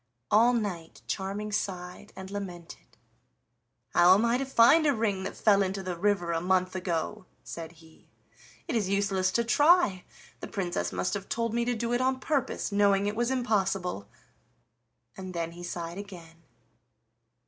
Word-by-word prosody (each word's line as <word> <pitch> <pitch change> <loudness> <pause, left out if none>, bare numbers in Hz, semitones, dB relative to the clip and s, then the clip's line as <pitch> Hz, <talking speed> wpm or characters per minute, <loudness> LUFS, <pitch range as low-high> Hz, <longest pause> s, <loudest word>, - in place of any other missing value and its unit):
All 230 +4 +5
night 190 -8 -4
Charming 200 +2 -4
sighed 180 0 -4
and 190 0 -9
lamented. 180 -4 -8 1.0
"How 180 +2 +7
am 215 +4 +2
I 235 +2 +2
to 270 - -1
find 270 +5 +5
a 285 - +3
ring 210 -4 -1
that - - -6
fell 200 -2 +4
into 195 0 -2
the 180 -1 -3
river 180 -1 0
a 165 0 -1
month 185 +1 +1
ago?" 180 +2 -3 0.2
said 165 0 -8
he. 160 -1 -20 0.6
"It - - -2
is 205 -5 0
useless 195 -2 +1
to 235 - +2
try; 290 - +4 0.4
the - - -7
Princess 180 -3 -3
must - - -2
have 200 -1 -5
told 230 -1 -1
me 235 0 0
to 245 0 0
do 235 +1 -2
it 245 - +1
on 260 0 +1
purpose, 275 -6 -2
knowing 200 -1 +3
it 205 +1 -1
was 240 +2 0
impossible." 195 - -1 1.1
And 185 -1 -8
then 170 -1 -2
he 175 +1 -11
sighed 175 +1 -5
again. 170 -5 -11
195 Hz, 165 wpm, -28 LUFS, 180-230 Hz, 1.1 s, How